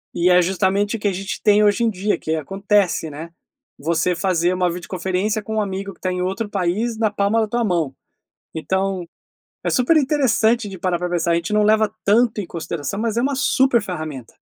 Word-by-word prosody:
E 175 +1 +3
é 180 0 +6
justamente 195 +3 0
o 225 - -5
que 205 - -1
a - - +2
gente 190 +1 -5
tem 210 0 +4
hoje 205 +3 +3
em 230 - +3
dia, 205 0 -1
que 160 - -2
acontece, 195 +1 0
né, 155 +3 -8 0.5
você 170 +4 +1
fazer 175 0 +1
uma 180 -1 +1
videoconferência 185 +4 -2
com 220 +2 -5
um 215 - +2
amigo 195 0 -4
que - - -17
está 185 - -2
em 180 0 -2
outro 195 +4 -2
país 205 +4 -1
na 220 - +2
palma 205 +2 +1
da 220 - 0
tua 235 +3 -1
mão. 170 -9 0 0.6
Então, 190 +2 -1 0.6
é - - 0
super 255 +6 +3
interessante 240 -6 +2
de 190 -2 -8
parar 180 0 0
para 180 +1 -3
pensar, 170 -1 0
a - - +3
gente 170 +5 -2
não 210 - +3
leva 215 0 +3
tanto 220 +1 +3
em 185 - -8
consideração, 170 +3 -4
mas 225 -1 -1
é - - +3
uma 275 +2 0
super 260 -3 +3
ferramenta. 155 - -6
195 Hz, 210 wpm, -21 LUFS, 175-215 Hz, 0.6 s, é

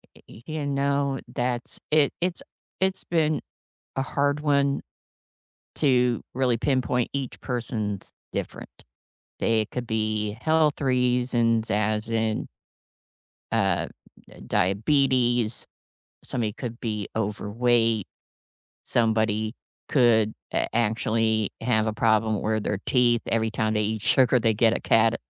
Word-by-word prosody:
E - - -17
eh 110 - -13
y 155 0 -3
you 145 - -3
know, 140 -1 0
that's 120 0 -3
it 150 -2 +4
it's 175 0 -1 0.4
it's 190 0 0
been 155 -2 +1 0.6
a 135 - +2
hard 145 +1 0
one 140 -2 +2 1.0
to 125 -4 +2
really 125 -2 +2
pinpoint, 125 -1 0
each 140 -2 -4
person's 110 -5 -3 0.2
different. - - -6 0.6
It 110 -2 +1
could 125 -1 -4
be 110 -1 -1
health 155 -2 +2
reasons 125 -3 +1
as 105 +1 0
in 110 -1 0 1.0
uh, - - +1 0.4
d - - -15
diabetes. 120 +3 +2 0.6
Somebody 115 -4 -2
could 120 -2 -6
be 105 -4 -3
overweight. 115 +1 +1 0.8
Somebody 110 -1 +1 0.3
could 115 -5 +4 0.2
a - - +1
actually 110 -1 +1
have 110 -2 +1
a 110 - 0
problem 110 -1 +2
where 110 0 0
their 100 -1 -2
teeth 120 -2 +3
every 110 -1 +1
time 110 0 0
they 105 - +1
eat 110 0 -2
sugar, 125 +2 +4
they 115 0 +3
get 115 +1 +3
a - - -6
cad 115 0 +3
115 Hz, 125 wpm, -25 LUFS, 110-130 Hz, 1.0 s, it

